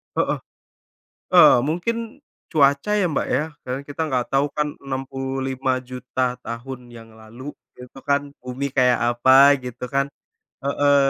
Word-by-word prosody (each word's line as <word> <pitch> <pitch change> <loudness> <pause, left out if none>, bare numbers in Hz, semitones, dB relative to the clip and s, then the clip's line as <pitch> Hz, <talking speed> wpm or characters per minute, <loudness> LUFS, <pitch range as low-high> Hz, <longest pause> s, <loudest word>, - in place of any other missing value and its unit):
Heeh. - - 0 0.9
Eee, - - +8
mungkin, 225 - -3 0.3
cuaca 140 +3 +3
ya, 190 - +2
Mbak, 155 - -1
ya? 150 - +1 0.2
Karena 130 +2 -4
kita 145 +3 -8
nggak 125 -2 0
tahu 140 +2 +3
kan 150 0 -2
65.000.000 130 -1 -3
tahun 120 +1 -7
yang 115 -1 -13
lalu, 115 +6 -10 0.2
itu 125 +1 -12
kan 140 0 -1
bumi 130 +2 -4
kayak 125 -2 +4 0.2
apa, 135 +3 +7
gitu 125 0 -7
kan? 140 +2 0 0.6
Heeh. 140 +1 +3
135 Hz, 130 wpm, -22 LUFS, 125-145 Hz, 0.9 s, Eee